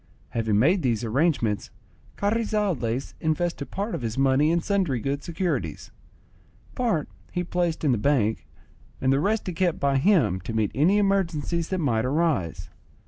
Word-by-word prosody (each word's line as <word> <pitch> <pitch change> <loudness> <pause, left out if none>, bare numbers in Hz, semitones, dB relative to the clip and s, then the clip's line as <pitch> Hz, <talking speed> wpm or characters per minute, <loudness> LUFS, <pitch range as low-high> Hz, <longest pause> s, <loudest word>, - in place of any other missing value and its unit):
Having 110 -3 0
made 170 - +3
these 120 -5 0
arrangements, 120 -3 0 0.5
Carrizales 200 - -1
invested 160 -2 -1
part 205 +3 -3
of - - -3
his 115 0 -3
money 135 +2 +3
in 170 +1 +2
sundry 180 - 0
good 140 +4 -2
securities; 175 +1 -3 0.8
part 225 - 0 0.2
he 180 - -1
placed 175 -2 -1
in 145 - +3
the 120 - +1
bank, 115 -4 +1 0.5
and 130 0 +2
the 135 - +2
rest 210 +7 0
he 180 - -3
kept 175 -1 0
by 140 -1 +2
him 135 - +3
to 115 - -6
meet 110 -2 +1
any 170 +9 +3
emergencies 170 -5 0
that 190 - -1
might 120 -10 +1
arise. 140 - -1
155 Hz, 155 wpm, -25 LUFS, 125-180 Hz, 0.8 s, made